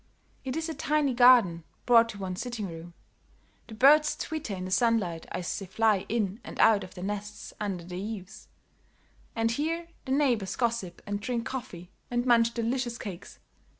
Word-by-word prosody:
It 260 Hz, 0 st, -4 dB
is 320 Hz, 0 st, -2 dB
a 325 Hz, -, -3 dB
tiny 300 Hz, -3 st, +1 dB
garden 240 Hz, -9 st, +6 dB, 0.2 s
brought 230 Hz, -1 st, +6 dB
to 210 Hz, -, -7 dB
one's 185 Hz, -2 st, -4 dB
sitting 235 Hz, -5 st, -4 dB
room; 165 Hz, 0 st, -10 dB, 0.7 s
the 220 Hz, -, -9 dB
birds 295 Hz, +5 st, +5 dB
twitter 310 Hz, -10 st, -4 dB
in 185 Hz, 0 st, -5 dB
the 185 Hz, -, -6 dB
sunlight, 200 Hz, -7 st, +1 dB
as 175 Hz, -, -3 dB
they 195 Hz, -, -8 dB
fly 215 Hz, 0 st, +1 dB
in 210 Hz, -2 st, -1 dB
and -, -, -9 dB
out 210 Hz, -3 st, +5 dB
of 185 Hz, -, -11 dB
their 180 Hz, -, -7 dB
nests 205 Hz, +1 st, -5 dB
under 195 Hz, -4 st, -3 dB
the 180 Hz, +1 st, -6 dB
eaves; 210 Hz, 0 st, -7 dB, 0.9 s
and 225 Hz, 0 st, +1 dB
here 330 Hz, +6 st, -2 dB, 0.2 s
the 260 Hz, -, -4 dB
neighbors 245 Hz, -9 st, +1 dB
gossip 230 Hz, -7 st, -2 dB
and 205 Hz, -1 st, -3 dB
drink 235 Hz, 0 st, -2 dB
coffee 190 Hz, -9 st, -7 dB, 0.2 s
and 240 Hz, 0 st, -1 dB
munch 235 Hz, -2 st, +4 dB
delicious 240 Hz, +1 st, -1 dB
cakes. 195 Hz, -6 st, -8 dB
225 Hz, 175 wpm, -28 LUFS, 190-250 Hz, 0.9 s, garden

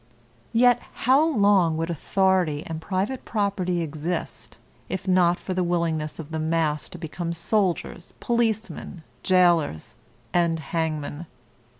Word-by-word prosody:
Yet 245 Hz, +1 st, +4 dB, 0.2 s
how 265 Hz, +5 st, +6 dB
long 200 Hz, -, +3 dB
would 165 Hz, +1 st, -2 dB
authority 180 Hz, -2 st, +1 dB
and 160 Hz, -1 st, -5 dB
private 200 Hz, +9 st, -2 dB
property 195 Hz, -5 st, -1 dB
exist, 160 Hz, +3 st, -5 dB, 0.3 s
if 190 Hz, 0 st, -4 dB
not 180 Hz, -2 st, +4 dB
for 185 Hz, -, -4 dB
the 185 Hz, 0 st, 0 dB
willingness 165 Hz, -3 st, -1 dB
of 160 Hz, -1 st, -8 dB
the 160 Hz, -, -2 dB
mass 155 Hz, -1 st, 0 dB
to -, -, -9 dB
become 170 Hz, +1 st, -4 dB
soldiers, 175 Hz, -1 st, -1 dB
policemen, 220 Hz, -7 st, -1 dB, 0.2 s
jailers, 175 Hz, -, +2 dB, 0.4 s
and 170 Hz, -2 st, +2 dB
hangmen. 160 Hz, -1 st, -3 dB
175 Hz, 120 wpm, -25 LUFS, 160-195 Hz, 0.4 s, how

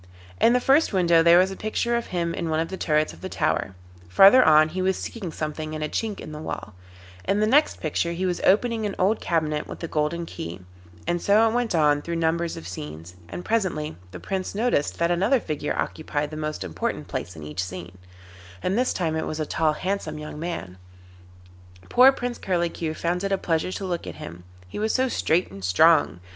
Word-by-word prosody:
In 235 Hz, -, +5 dB
the 250 Hz, -, +4 dB
first 270 Hz, +2 st, +3 dB
window 170 Hz, -3 st, +4 dB
there 170 Hz, +1 st, +7 dB
was 185 Hz, +1 st, +4 dB
a -, -, -5 dB
picture 220 Hz, +3 st, -1 dB
of 235 Hz, -, -2 dB
him 170 Hz, -2 st, -2 dB
in 170 Hz, -3 st, -3 dB
one 155 Hz, 0 st, +1 dB
of 165 Hz, -, -1 dB
the 190 Hz, -, -4 dB
turrets 155 Hz, -, 0 dB
of 85 Hz, -, -15 dB
the -, -, -5 dB
tower, 95 Hz, -, -1 dB, 0.3 s
farther 195 Hz, -, +8 dB
on 155 Hz, 0 st, +6 dB
he 185 Hz, +3 st, -3 dB
was 190 Hz, 0 st, +1 dB
seeking 195 Hz, -8 st, -6 dB
something 155 Hz, 0 st, -4 dB
in 155 Hz, -, -4 dB
a -, -, 0 dB
chink 215 Hz, +6 st, -3 dB
in -, -, -8 dB
the 150 Hz, 0 st, -7 dB
wall, 105 Hz, -, -6 dB, 0.5 s
in 200 Hz, +2 st, +1 dB
the 215 Hz, -, +3 dB
next 285 Hz, +8 st, +3 dB
picture 165 Hz, +2 st, -1 dB
he 175 Hz, +2 st, -2 dB
was 180 Hz, -1 st, -1 dB
opening 220 Hz, +2 st, +2 dB
an 200 Hz, -, -5 dB
old 200 Hz, +4 st, +1 dB
cabinet 155 Hz, -3 st, -1 dB
with -, -, -9 dB
a -, -, -2 dB
golden 160 Hz, +2 st, -1 dB
key, 85 Hz, -, -7 dB, 0.4 s
and 175 Hz, 0 st, -1 dB
so 215 Hz, +3 st, +4 dB
it 225 Hz, -, 0 dB
went 240 Hz, -5 st, 0 dB
on 150 Hz, -2 st, +3 dB
through 170 Hz, +2 st, -4 dB
numbers 165 Hz, +1 st, 0 dB
of 80 Hz, -, -8 dB
scenes, 80 Hz, 0 st, -8 dB
and 180 Hz, -, -7 dB
presently 185 Hz, -9 st, -1 dB
the -, -, -9 dB
Prince 190 Hz, 0 st, -4 dB
noticed 220 Hz, -9 st, 0 dB
that 170 Hz, +1 st, +1 dB
another 200 Hz, +10 st, +3 dB
figure 150 Hz, -6 st, -3 dB
occupied 150 Hz, -1 st, -3 dB
the -, -, -6 dB
most 155 Hz, -6 st, -4 dB
important 85 Hz, -4 st, -3 dB
place 90 Hz, -, -5 dB
in 80 Hz, -, -9 dB
each 75 Hz, +5 st, -3 dB
scene, 90 Hz, 0 st, -8 dB, 0.6 s
and 185 Hz, -, 0 dB
this 250 Hz, +2 st, +1 dB
time 165 Hz, -3 st, -1 dB
it 160 Hz, -, -2 dB
was 155 Hz, -, -4 dB
a 155 Hz, -, -1 dB
tall 155 Hz, +1 st, +1 dB
handsome 185 Hz, -2 st, -3 dB
young 150 Hz, 0 st, -7 dB
man: 150 Hz, -, -5 dB, 1.1 s
poor 255 Hz, +2 st, +7 dB
Prince 245 Hz, -2 st, -4 dB
Curlicue 170 Hz, -3 st, -1 dB
found 175 Hz, +3 st, -1 dB
it 195 Hz, -, -1 dB
a 195 Hz, -, +2 dB
pleasure 165 Hz, 0 st, -1 dB
to 195 Hz, -, -4 dB
look 175 Hz, -, -3 dB
at 85 Hz, -, -6 dB
him, 85 Hz, +3 st, -10 dB, 0.2 s
he 90 Hz, -, -7 dB
was 215 Hz, +1 st, 0 dB
so 260 Hz, 0 st, +2 dB
straight 180 Hz, -7 st, 0 dB
and 100 Hz, 0 st, -10 dB
strong. 90 Hz, -, +4 dB
170 Hz, 220 wpm, -24 LUFS, 150-195 Hz, 1.1 s, farther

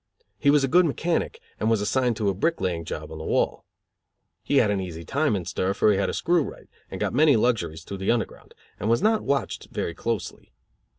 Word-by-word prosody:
He 140 Hz, -, +3 dB
was 145 Hz, -1 st, +5 dB
a -, -, +2 dB
good 175 Hz, +5 st, +5 dB
mechanic 175 Hz, -, -1 dB, 0.2 s
and -, -, +1 dB
was 115 Hz, -2 st, +3 dB
assigned 120 Hz, +2 st, +1 dB
to 105 Hz, -, -1 dB
a -, -, +1 dB
brick 165 Hz, -, 0 dB
laying 85 Hz, -3 st, -2 dB
job 80 Hz, 0 st, -6 dB
on 80 Hz, -, -7 dB
the -, -, -6 dB
wall. -, -, 0 dB, 0.8 s
He 140 Hz, -, 0 dB
had 110 Hz, -5 st, +4 dB
an 100 Hz, -, 0 dB
easy 85 Hz, -3 st, -7 dB
time 145 Hz, -4 st, +1 dB
in 90 Hz, -3 st, -3 dB
stir, 95 Hz, +2 st, -1 dB
for 105 Hz, -, +4 dB
he 100 Hz, -, +2 dB
had -, -, +1 dB
a -, -, -3 dB
screw 175 Hz, -1 st, +2 dB
right, -, -, -9 dB, 0.2 s
and -, -, -6 dB
got -, -, -1 dB
many 145 Hz, +1 st, +5 dB
luxuries 85 Hz, -9 st, 0 dB
through 100 Hz, -, -7 dB
the 95 Hz, -, -2 dB
Underground; 120 Hz, -1 st, -2 dB, 0.2 s
and 105 Hz, -, -1 dB
was 115 Hz, +10 st, +2 dB
not 220 Hz, 0 st, +3 dB
watched 140 Hz, -3 st, -2 dB
very 85 Hz, -, -3 dB
closely. 115 Hz, -, -4 dB
115 Hz, 230 wpm, -25 LUFS, 95-140 Hz, 0.8 s, was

